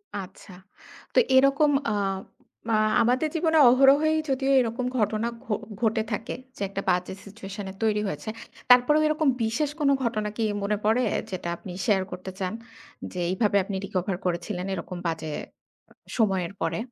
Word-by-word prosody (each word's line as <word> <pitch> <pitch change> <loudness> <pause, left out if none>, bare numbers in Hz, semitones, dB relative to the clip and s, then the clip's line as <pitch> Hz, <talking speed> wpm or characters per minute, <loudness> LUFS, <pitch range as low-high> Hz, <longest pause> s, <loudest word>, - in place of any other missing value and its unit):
আচ্ছা। 190 0 -8 0.6
তো - - +5 0.2
এরকম 275 +3 +5 0.2
আ - - 0 0.8
মা 225 - +3 0.3
আমাদের 255 +6 +2
জীবনে 320 -1 +2
অহরহই 275 +5 +5
যদিও 270 0 +1
এরকম 245 0 -1
ঘটনা 215 0 0 0.2
ঘ - - -23 0.4
ঘটে 220 -1 +2
থাকে 210 +2 -3 0.2
যে - - -11
একটা 195 0 -4
বাজে 180 +1 0
সিচুয়েশনে 200 -1 -8
তৈরি 210 -1 +2
হয়েছে। 150 +2 -5 0.4
তারপরেও 250 +5 +6
এরকম 310 0 +1 0.2
বিশেষ 235 +7 0
কোন 290 -2 +3
ঘটনা 215 -3 -1
কি 225 - 0 0.2
মনে 205 +1 0
পড়ে 220 +4 +3 0.3
যেটা 185 -2 -4
আপনি 185 - -9 0.2
শেয়ার 195 -3 +3
করতে 185 +1 -6
চান? 185 0 -2 0.6
যে - - -9
এইভাবে 200 +2 +2
আপনি 195 +1 -5
রিকভার 185 -1 -2
করেছিলেন 180 +1 -2
এরকম 180 0 -5
বাজে 160 -1 -3 0.9
সময়ের 195 -5 +1
পরে? 165 0 -1
215 Hz, 150 wpm, -26 LUFS, 190-255 Hz, 0.9 s, তারপরেও